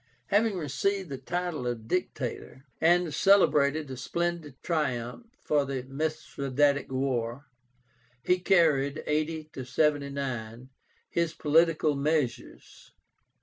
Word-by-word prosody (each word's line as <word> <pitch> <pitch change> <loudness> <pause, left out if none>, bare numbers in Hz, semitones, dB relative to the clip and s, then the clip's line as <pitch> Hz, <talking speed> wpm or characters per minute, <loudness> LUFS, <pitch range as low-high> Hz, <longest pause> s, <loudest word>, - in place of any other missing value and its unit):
Having 205 -1 +2
received 180 +5 -1
the 135 -2 -5
title 175 -2 -3
of 115 -2 -4
Dictator, 135 -5 -3 0.2
and 175 -1 +3
celebrated 150 -7 +3
a - - -4
splendid 170 +1 -3
triumph 145 - -2
for 150 -2 +1
the 135 -2 -4
Mithradátic 140 -1 -1
war, 130 -1 -2 0.8
he 180 0 +2
carried 155 -6 +2
(80 155 +1 -2
79) 130 -4 -1 0.4
his 170 -1 -1
political 155 -1 +3
measures. 145 -3 -3
150 Hz, 100 wpm, -28 LUFS, 135-165 Hz, 0.8 s, and